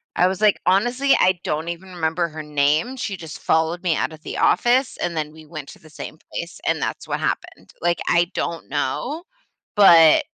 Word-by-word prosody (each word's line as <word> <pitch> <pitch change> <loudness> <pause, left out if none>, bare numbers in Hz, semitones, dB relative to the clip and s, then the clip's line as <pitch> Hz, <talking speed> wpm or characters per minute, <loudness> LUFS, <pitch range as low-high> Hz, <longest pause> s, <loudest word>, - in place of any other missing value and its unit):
I 180 - +4
was, 190 +2 -3
like, 210 -2 +4
"Honestly, 245 +9 +3
I 185 -1 +3
don't 155 +2 -2
even 180 +2 -7
remember 165 0 -1
her 155 0 -7
name, 150 - +1
she 200 -6 -4
just 160 -3 -9
followed 160 +3 +1
me 170 -3 +2
out 160 - -2
of 155 - -13
the - - -6
office, 250 +1 +2
and 175 -1 -3
then 150 -1 -2
we 160 0 -14
went 155 -3 -8
to - - -13
the 155 - -17
same 150 - -9
place, - - -6
and - - +1
that's - - -4
what - - -2
happened, - - -4
like, 170 0 +1
I 170 +1 +2
don't 170 - -4
know. 150 - -2 0.5
But, 170 -6 +8
uh, - - 0
170 Hz, 210 wpm, -22 LUFS, 155-190 Hz, 0.5 s, But